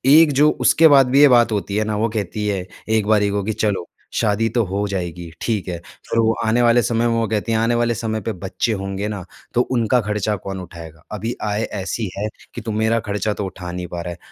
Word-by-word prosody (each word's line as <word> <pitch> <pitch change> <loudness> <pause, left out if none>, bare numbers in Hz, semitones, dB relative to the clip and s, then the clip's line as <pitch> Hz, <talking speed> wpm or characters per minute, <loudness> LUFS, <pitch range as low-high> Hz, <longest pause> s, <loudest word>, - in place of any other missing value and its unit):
एक 160 -2 +7
जो 150 - +7 0.2
उसके 160 +1 +6
बाद 135 -3 +6
भी 140 +2 +5
ये 145 - +9
बात 120 -1 +3
होती 100 -1 -2
है 110 - +2
ना, 110 -1 -2
वो 110 +2 +1
कहती 105 -1 -3
है 95 -3 -1 0.2
एक 110 -2 +1
बारी 105 -2 +3
को, 100 -1 -1
कि 110 +2 -2
चलो 100 -5 -1 0.3
शादी 110 +1 +1
तो 120 - +3
हो 100 +3 -2
जाएगी, 90 -3 -4
ठीक 110 -6 -1
है। 85 -1 -3
फ़िर 115 - -5
वो 115 0 +3
आने 115 +2 +2
वाले 120 0 +5
समय 115 +1 +1
में 115 - +1
वो 115 -1 +1
कहती 110 +1 -1
हैं 110 - +2
आने 115 +1 +2
वाले 120 0 +1
समय 110 -1 -2
पे 115 - -3
बच्चे 95 +5 -2
होंगे 95 +1 -3
ना, 100 -4 -5 0.3
तो 120 - +3
उनका 125 -1 +1
ख़र्चा 105 0 -1
कौन 95 0 -6
उठाएगा? 80 -3 -11
अभी 110 +3 -3
आय 105 +1 -1
ऐसी 100 +1 -3
है 105 +2 -1 0.3
कि 120 - -5
तू 110 0 -4
मेरा 110 +2 +1
ख़र्चा 105 +1 -1
तो 100 - -4
उठा 90 -2 -7
नहीं 90 0 -5
पा 85 0 -5
रहा 90 0 -5
है। 85 - -8
105 Hz, 245 wpm, -20 LUFS, 95-115 Hz, 0.3 s, ये